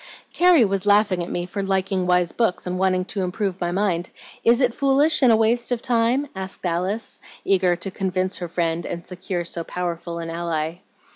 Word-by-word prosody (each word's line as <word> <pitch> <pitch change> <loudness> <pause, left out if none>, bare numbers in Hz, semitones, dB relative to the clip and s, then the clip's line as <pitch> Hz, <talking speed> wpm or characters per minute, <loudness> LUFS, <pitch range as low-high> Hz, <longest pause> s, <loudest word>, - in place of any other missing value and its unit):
"Carrie 350 -8 +5
was 195 0 -2
laughing 205 -3 +4
at 170 - -4
me 175 - -2
for 200 +3 -4
liking 190 -1 0
wise 180 -1 +2
books 225 -6 0
and 180 0 -3
wanting 185 -1 +1
to 195 +1 -3
improve 190 0 -2
my 175 0 0
mind. 180 -2 0 0.3
Is 235 +1 +4
it 250 -3 +2
foolish 280 +4 +3
and 255 -3 +6
a - - +6
waste 235 +2 +1
of 245 - +1
time?" 245 +3 +1
asked 190 0 -6
Alice, 180 +6 -2 0.3
eager 185 -2 +3
to 190 +3 -5
convince 185 -1 -1
her 175 - -5
friend 170 0 -1
and 170 -1 -5
secure 180 -1 -4
so 170 0 -2
powerful 170 -1 -4
an 165 0 -5
ally. 165 -1 -2
185 Hz, 195 wpm, -23 LUFS, 175-220 Hz, 0.3 s, and